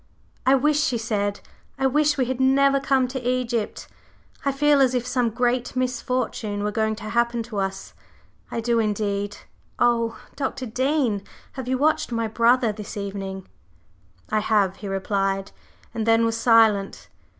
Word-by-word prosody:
"I 265 - +7
wish," 295 +2 +2
she 255 -4 +1
said 205 -3 -2 0.4
"I 270 - 0
wish 295 +2 +2
we 260 - +2
had 255 +1 -3
never 275 +1 +4
come 265 -2 +2
to 260 0 -4
Egypt! 245 -3 -2 0.6
I 280 - +1
feel 290 +1 +3
as 255 -1 +3
if 245 -1 -1
some 250 -2 +1
great 245 +2 -1
misfortune 250 -4 -2
were 210 - -1
going 220 0 0
to 210 - -11
happen 235 0 +1
to 220 -3 -5
us; 195 0 -4 0.6
I 230 - -3
do, 235 0 +1
indeed! 205 -1 -1 0.4
Oh, 230 -2 +2 0.2
Dr. 270 -2 -3
Dean, 255 -2 0 0.3
have 260 -2 -7
you 260 0 +1
watched 310 0 +1
my 230 -1 -1
brother 235 +1 +3
this 210 0 -8
evening?" 195 -1 -5 0.8
"I 215 - +2
have," 205 -3 +1
he 205 - -7
replied, 195 0 -1 0.4
and 225 -1 -3
then 225 0 +4
was 225 0 0
silent. 225 -4 +3
235 Hz, 160 wpm, -24 LUFS, 210-255 Hz, 0.8 s, I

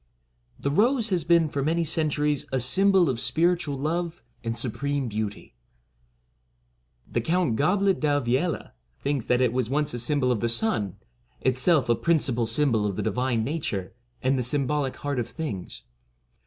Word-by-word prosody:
The 140 - -1
Rose 230 - +2
has 180 -4 +1
been 170 0 +4
for 140 -1 -3
many 165 +4 +1
centuries 150 -2 0
a 130 - +1
sym 190 +11 +4
bol 190 -3 +4
of 125 -4 -1
spiritual 170 -1 +1
love 165 +2 -2 0.2
and 115 0 -3
supreme 140 +2 -1
beauty. 105 -1 -5 1.5
The 120 - -1
Count 165 -2 +1
Goblet 190 - +2
D'Alviella 145 +2 0 0.3
thinks 140 -4 -2
that 125 0 +2
it 125 -2 +2
was 125 -3 -1
once 145 +1 0
a 120 - -3
symbol 125 +1 +1
of 120 - 0
the 115 - 0
sun, 110 - 0 0.2
— - - -38
itself 130 +3 +2
a 120 - +4
principal 130 -5 +1
symbol 115 -2 +1
of 100 - -3
the - - -2
divine 115 +1 0
nature, 130 - -3 0.3
and 130 +1 +2
the - - 0
sym 135 +2 0
bolic 145 -2 -1
heart 145 -3 -3
of 120 - -3
things. 140 - -6
140 Hz, 170 wpm, -26 LUFS, 120-160 Hz, 1.5 s, been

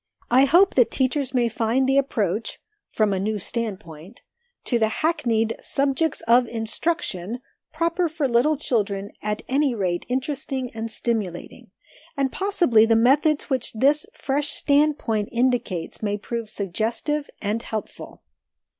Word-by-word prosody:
I 260 +3 +6
hope 350 +8 +5
that 245 -3 +4
teachers 265 0 0
may 240 -1 +3
find 230 +3 0
the 270 +1 +4
approach 215 -6 -2 0.3
(from 215 -2 +1
a 190 - -1
new 210 +2 -1
standpoint), 190 -6 -5 0.4
to 240 - 0
the 220 - +3
hackneyed 225 -5 0
"subjects 280 +3 0
of 240 +1 +4
instruction" 225 - -2 0.3
proper 335 +2 0
for 310 -3 -1
little 260 +6 +2
children 205 -7 -1
at 210 0 -3
any 275 -1 +1
rate 180 -4 -2
interesting 265 0 -2
and 225 0 -4
stimulating; 215 -6 -3 0.5
and 270 -1 +1
possibly 345 - +3
the 225 - +4
methods 280 +6 +3
which 260 -2 -1
this 280 +6 +2
fresh 290 +2 -2
standpoint 280 -8 +1
indicates 240 -8 -1
may 205 -1 -1
prove 230 +1 -5
suggestive 225 - -2
and 215 +2 -2
helpful. 220 -2 -7
240 Hz, 135 wpm, -23 LUFS, 215-280 Hz, 0.5 s, I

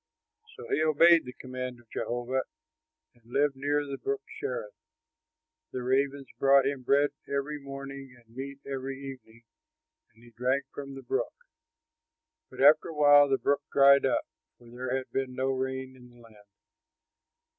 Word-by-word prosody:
So - - -10
he 155 - +1
obeyed 160 +1 +5
the 125 - -8
command 130 -1 -6
of 120 - -22
Jehovah 120 +2 -2 0.7
and 120 -2 -28
lived 140 +1 +2
near 145 +2 0
the 140 -1 -6
Brook 415 0 -3 0.2
Cherith. - - -4 1.0
The 125 - -4
ravens 135 +2 0
brought 135 0 +5
him 140 -1 -1
bread 140 +3 +3 0.2
every 140 +2 -2
morning 135 -1 -8
and 115 -1 -23
meat 135 +1 -6
every 135 0 -4
evening, 130 -4 -10 0.7
and 115 - -23
he 120 - -16
drank 125 +4 0
from 140 -1 -7
the 135 - -9
brook. 430 +5 -2 1.1
But - - -8
after 145 +2 +6
a 160 - -7
while 145 -1 +6
the 135 - +3
brook 140 +1 +1
dried 140 0 +6
up, - - 0 0.3
for 120 -1 -17
there 125 +1 -2
had 130 - -7
been 130 -1 -2
no 130 +1 0
rain 130 0 -3
in 125 -1 -16
the 120 0 -20
land. 110 -3 -18
135 Hz, 160 wpm, -29 LUFS, 125-140 Hz, 1.1 s, after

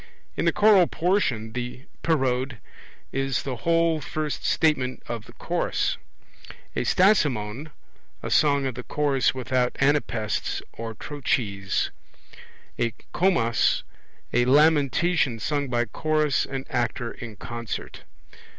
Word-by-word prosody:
In - - -1
the - - +5
choral 205 -4 +5
portion 135 - 0
the 125 +1 -5 0.2
Parode 130 -5 0 0.5
is 135 0 -1
the 130 -3 -4
whole 165 +1 +2
first 150 -3 -3
statement 130 -5 +1
of 115 -2 -5
the - - -14
chorus; - - -1 0.8
a - - -1
Stasimon, 145 - +2 0.5
a - - -4
song 140 -2 +3
of 130 - -1
the 125 - -6
chorus 140 -1 +1
without 125 -1 0
anapaests 135 -6 0
or 115 -1 -6
trochees; 105 -8 -1 0.9
a 115 -1 0 0.2
Commas, 145 - +2 0.5
a 120 - +3
lamentation 150 0 +3
sung 140 +5 -1
by 120 -1 +1
chorus 155 +4 0
and 135 -1 -5
actor 120 -1 -1
in 115 -3 -9
concert. 115 +2 -6
135 Hz, 115 wpm, -25 LUFS, 120-155 Hz, 0.9 s, the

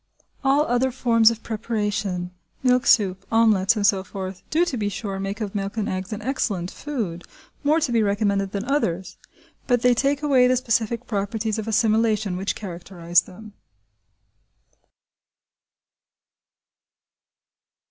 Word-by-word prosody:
All 275 +2 +4
other 250 -1 +1
forms 230 -3 +4
of 230 -1 -5
preparation, 205 -5 -2 0.3
milk 250 -1 +3
soup, 195 -3 +3
omelettes, 220 -2 +4
and 210 -2 0
so 195 -2 +3
forth, 190 -1 -7
do, 335 +3 +2
to 345 - -3
be 210 -3 -1
sure, 200 -1 -5
make 195 +3 -4
of 205 -2 -3
milk 200 +1 -4
and 215 - -1
eggs 185 +2 -4
an 215 - -5
excellent 200 -9 -2
food, 215 - -4 0.4
more 300 +3 +3
to 275 - -1
be 230 -1 +3
recommended 200 -1 0
than 200 -1 -3
others; 190 - -1 0.5
but 245 -2 +2
they 250 0 +5
take 280 +4 0
away 265 -4 +4
the 255 0 +3
specific 230 -1 -1
properties 215 +1 -2
of 220 - -5
assimilation 220 -3 +2
which 190 +2 -2
characterise 175 -3 0
them. 210 +3 -13
215 Hz, 135 wpm, -23 LUFS, 195-240 Hz, 0.5 s, they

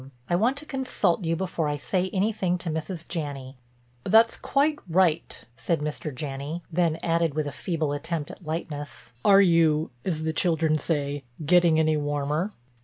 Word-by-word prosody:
I 175 - +1
want 235 +9 +2
to 295 - -7
consult 230 - 0
you 165 +1 +1
before 175 -3 -2
I 145 0 -1
say 185 +5 -1
anything 190 -2 0
to 170 -2 -4
Mrs. 160 +2 -4
Janney." 140 -5 -5 0.5
"That's 225 - +5
quite 295 +2 +1
right," 165 -2 +1
said 165 +5 -1
Mr. 150 +1 -4
Janney, 140 +5 -5
then 165 -1 +1
added 165 -3 +1
with 155 -1 0
a 145 - -3
feeble 160 -1 -2
attempt 155 +1 -3
at - - -13
lightness, 145 -6 -5
"Are 200 -1 +7
you, 165 -5 +3
as 155 -4 -2
the 160 0 -1
children 160 -1 +2
say, 145 -2 -2 0.2
getting 170 0 +5
any 155 -1 +3
warmer?" 145 +5 -1
165 Hz, 165 wpm, -26 LUFS, 150-180 Hz, 0.5 s, Are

